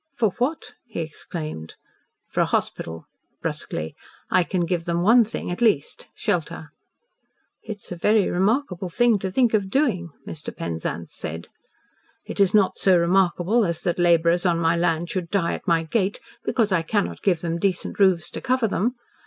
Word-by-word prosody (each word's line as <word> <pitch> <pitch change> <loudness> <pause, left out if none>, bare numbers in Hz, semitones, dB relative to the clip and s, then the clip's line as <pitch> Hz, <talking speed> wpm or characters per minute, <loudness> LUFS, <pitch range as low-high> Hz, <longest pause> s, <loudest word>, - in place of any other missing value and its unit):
"For 220 -4 +2
what?" 280 +6 -2
he 225 - -6
exclaimed 155 - -6 0.6
"For - - +1
a - - +2
hospital," 80 0 -2 0.3
brusquely 80 +1 -4 0.4
"I 185 - +4
can 175 0 -1
give 170 -1 -2
them 170 0 0
one 230 +5 +7
thing, 215 -4 -5
at 175 - -5
least 205 -12 +1
shelter." 160 -5 -2 0.9
"It 215 - -6
is - - -11
a 175 - -4
very 210 +3 +3
remarkable 190 -1 0
thing 235 +3 +3
to 190 0 -3
think 240 +2 +2
of 200 -3 +1
doing," 205 - +1 0.2
Mr. 150 -2 -7
Penzance 85 -1 -4
said. 80 +1 -6 0.8
"It - - -7
is 195 -2 +5
not 205 -3 +3
so 185 -2 +5
remarkable 180 +5 +2
as 170 -3 -1
that 175 -1 -1
labourers 170 0 +4
on 175 -3 +2
my 165 0 +2
land 170 0 0
should 180 -3 -3
die 190 -3 +1
at - - -7
my 165 -2 +3
gate 195 +4 0 0.2
because 225 -5 +1
I 185 -3 +3
cannot 205 +5 -1
give 180 -5 +1
them 170 -1 -2
decent 190 +1 -1
roofs 185 -4 +3
to - - -6
cover 255 -3 +1
them. 230 +5 0
180 Hz, 175 wpm, -24 LUFS, 170-210 Hz, 0.9 s, one